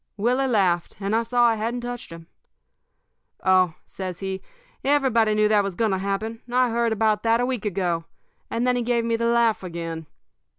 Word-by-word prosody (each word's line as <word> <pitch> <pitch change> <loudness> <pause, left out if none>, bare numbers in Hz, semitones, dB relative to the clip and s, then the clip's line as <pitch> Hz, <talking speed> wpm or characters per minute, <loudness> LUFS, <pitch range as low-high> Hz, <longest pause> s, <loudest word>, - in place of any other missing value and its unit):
"Willie 250 +6 +1
laughed, 185 -8 +1
and 200 +2 -1
I 230 - +3
saw 240 +1 +2
I 230 - +5
hadn't 230 +3 -2
touched 245 -5 -6
him. 165 0 -10 1.2
"'Oh,' 185 -3 +4
says 185 -2 -6
he, 190 -1 -4 0.4
'everybody 255 -6 +3
knew 215 0 +4
that 210 -1 +4
was 195 -2 -4
going 225 0 +1
to 190 - 0
happen. 215 +4 -3
I 250 -1 +3
heard 235 0 +1
about 215 -1 +1
that 230 0 +2
a 245 - +2
week 250 -4 -3
ago.' 175 -4 -1 0.4
And 230 +2 -1
then 250 0 +2
he 245 - 0
gave 235 -1 0
me 230 0 +1
the 235 +1 0
laugh 235 -2 +3
again. 165 -3 -6
220 Hz, 195 wpm, -24 LUFS, 190-235 Hz, 1.2 s, I